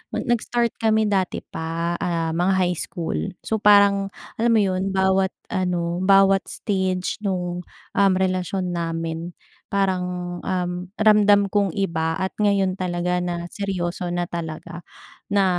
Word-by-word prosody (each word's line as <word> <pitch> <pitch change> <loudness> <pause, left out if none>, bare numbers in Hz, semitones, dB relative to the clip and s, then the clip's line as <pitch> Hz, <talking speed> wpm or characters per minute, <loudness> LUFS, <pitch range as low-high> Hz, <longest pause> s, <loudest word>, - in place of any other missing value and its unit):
nag-start 240 0 0
kami 220 -1 +3
dati 190 -3 0
pa, 165 +1 -3
ah, 165 -2 -1
mga 175 +4 +1
high 180 -1 0
school, 165 - -3 0.2
so 220 - -1
parang 200 -1 +5 0.3
alam 235 +1 +3
mo 215 - +5
yun 190 0 -1
bawat 190 0 +2 0.2
ano 175 -2 -1
bawat 195 0 +5
stage 190 -2 -2
nung, 180 -2 -2 0.3
um, 200 -1 +5
relasyon 185 0 -1
namin 165 0 -3 0.4
parang, 180 -2 -1
um, 180 0 -3
ramdam 210 -2 +5
kung 200 0 +1
iba 165 -4 0
at 190 0 -2
ngayon 200 -2 +2
talaga 180 -1 -1
na 175 -1 -3
seryoso 180 -3 -3
na 175 0 -1
talaga, 170 +1 -6 0.5
na 200 -1 +3
185 Hz, 130 wpm, -23 LUFS, 175-195 Hz, 0.5 s, parang